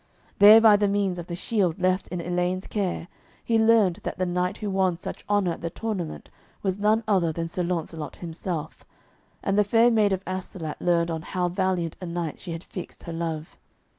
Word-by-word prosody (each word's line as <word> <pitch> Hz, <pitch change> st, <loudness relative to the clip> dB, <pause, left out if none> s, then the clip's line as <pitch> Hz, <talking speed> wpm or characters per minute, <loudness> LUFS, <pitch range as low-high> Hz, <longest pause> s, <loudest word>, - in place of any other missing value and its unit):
There 210 Hz, +2 st, +10 dB
by 220 Hz, -2 st, +7 dB
the 205 Hz, 0 st, +2 dB
means 195 Hz, -3 st, 0 dB
of 170 Hz, -, -7 dB
the 170 Hz, -, -4 dB
shield 185 Hz, -3 st, 0 dB
left 185 Hz, +1 st, +1 dB
in 180 Hz, -, -4 dB
Elaine's 180 Hz, +2 st, -1 dB
care 190 Hz, -5 st, -2 dB, 0.4 s
he 225 Hz, -1 st, +2 dB
learned 220 Hz, -5 st, +4 dB
that -, -, -5 dB
the 185 Hz, -, 0 dB
knight 180 Hz, +1 st, -1 dB
who 210 Hz, -2 st, -3 dB
won 190 Hz, -2 st, +1 dB
such -, -, -7 dB
honour 205 Hz, -4 st, +2 dB
at -, -, -6 dB
the 170 Hz, -, -2 dB
tournament 190 Hz, -4 st, -5 dB, 0.3 s
was 190 Hz, 0 st, -1 dB
none 215 Hz, +2 st, +3 dB
other 185 Hz, -6 st, +2 dB
than 165 Hz, +1 st, -3 dB
Sir 180 Hz, +2 st, -3 dB
Launcelot 165 Hz, -3 st, -3 dB
himself, 165 Hz, -2 st, -5 dB, 0.6 s
and 195 Hz, +1 st, +1 dB
the -, -, +6 dB
Fair 230 Hz, +4 st, +4 dB
Maid 215 Hz, -3 st, +3 dB
of 190 Hz, 0 st, -1 dB
Astolat 185 Hz, -4 st, -5 dB
learned 170 Hz, -1 st, +2 dB
on 160 Hz, -1 st, -3 dB
how 180 Hz, +1 st, -2 dB
valiant 180 Hz, -3 st, -1 dB
a 180 Hz, -, -5 dB
knight 170 Hz, -2 st, -4 dB
she 175 Hz, -, -7 dB
had 165 Hz, +1 st, -5 dB
fixed 180 Hz, -, -9 dB
her 170 Hz, -, -6 dB
love. 165 Hz, -1 st, -4 dB
180 Hz, 200 wpm, -25 LUFS, 170-200 Hz, 0.6 s, There